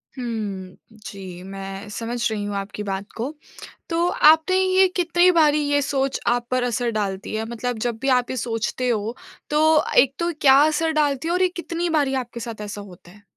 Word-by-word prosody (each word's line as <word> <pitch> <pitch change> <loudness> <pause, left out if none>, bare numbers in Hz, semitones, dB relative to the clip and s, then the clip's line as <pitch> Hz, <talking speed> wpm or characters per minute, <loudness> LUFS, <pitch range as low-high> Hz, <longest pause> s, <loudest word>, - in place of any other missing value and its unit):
हुँ। 210 -7 -5 0.3
जी 185 -3 -9
मैं 195 +1 -7
समझ 230 +2 -2
रही 210 -1 -3
हूँ 205 0 -4
आपकी 200 +1 -5
बात 195 -1 -3
को। 255 +7 -3 0.6
तो 340 +1 +1 0.2
आपने 320 +4 +4
ये 375 0 +4
कितनी 350 0 +3
बारी 305 -3 +4
ये 285 0 +2
सोच 270 -1 -1
आप 240 0 +1
पर 255 -1 +1
असर 245 0 -1
डालती 200 -1 -3
है? 220 +1 -2
मतलब 240 0 -3
जब 235 - -3
भी 270 - 0
आप 245 - -6
ये 260 - -4
सोचते 235 +2 -2
हो 225 0 -1 0.3
तो 300 +1 +2 0.4
एक 270 0 0
तो 340 0 0
क्या 270 -2 +7
असर 320 +1 0
डालती 285 +1 0
है 340 - 0
और 360 - +1
ये 370 - +5
कितनी 340 +1 -3
बारी 275 -2 0
आपके 240 0 -10
साथ 225 -2 -7
ऐसा 205 0 -6
होता 180 -3 -14
है? 205 +1 -19
240 Hz, 200 wpm, -22 LUFS, 205-295 Hz, 0.6 s, क्या